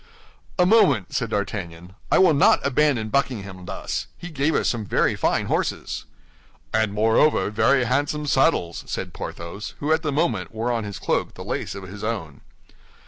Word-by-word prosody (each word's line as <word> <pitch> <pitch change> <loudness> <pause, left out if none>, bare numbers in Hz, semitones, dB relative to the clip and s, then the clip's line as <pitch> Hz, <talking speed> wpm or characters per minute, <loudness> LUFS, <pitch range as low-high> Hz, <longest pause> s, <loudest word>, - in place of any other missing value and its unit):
"A 180 - +4
moment," 145 - +4
said 115 - -1
D'Artagnan. 95 -4 -4 0.2
"I - - +5
will 185 -4 +6
not 140 - +5
abandon 135 -5 +2
Buckingham 100 -8 -2
thus. - - -4
He 175 - -8
gave 150 +1 0
us - - +1
some 115 -3 -1
very 100 - +1
fine - - +1
horses." - - -2 0.7
"And 110 -2 +2
moreover, 110 +1 +3
very 130 +5 +3
handsome 145 +4 0
saddles," 135 - +1
said - - -4
Porthos, 85 +5 -7
who 150 +2 +1
at 160 - +1
the 155 -3 -1
moment 110 - 0
wore 115 +3 -1
on 115 -3 -1
his 100 -2 -6
cloak - - -1
the - - -8
lace - - -3
of 100 - -7
his 100 +2 -9
own. 100 -10 -4
115 Hz, 170 wpm, -23 LUFS, 100-145 Hz, 0.7 s, will